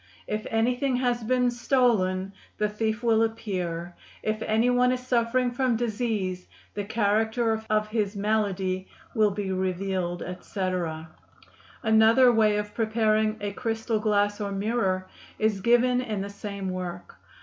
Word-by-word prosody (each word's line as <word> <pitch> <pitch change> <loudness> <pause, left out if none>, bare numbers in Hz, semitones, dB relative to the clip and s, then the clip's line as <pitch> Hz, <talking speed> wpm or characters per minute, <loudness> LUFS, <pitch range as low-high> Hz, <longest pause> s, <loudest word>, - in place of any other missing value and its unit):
If 215 0 -3
anything 250 +4 +1
has 245 -2 0
been 250 +1 +2
stolen, 220 -7 +1 0.2
the 210 - +1
thief 220 +2 -2
will 225 -1 +3
appear; 180 -7 -2 0.3
if 215 0 -1
any 220 +3 +2
one 250 0 +3
is 255 0 -3
suffering 245 0 +1
from 250 -1 +1
disease, 215 -5 -2 0.3
the 205 - -3
character 220 +2 +1
of 215 0 +2
his 215 -2 -1
malady 195 -3 -1 0.3
will 215 -3 +4
be 200 -1 -3
revealed, 185 -1 -2
etc. 180 -3 -3 0.8
Another 225 +3 +6
way 215 -2 +3
of 210 0 -4
preparing 220 -1 +1
a 205 0 -2
crystal 225 0 -2
glass 205 -1 +1
or 200 -1 -2
mirror 195 -2 0 0.3
is 215 -2 0
given 245 +3 +3
in 215 -5 -3
the 200 +1 -5
same 200 -2 -5
work. 180 -1 -6
215 Hz, 140 wpm, -26 LUFS, 195-230 Hz, 0.8 s, Another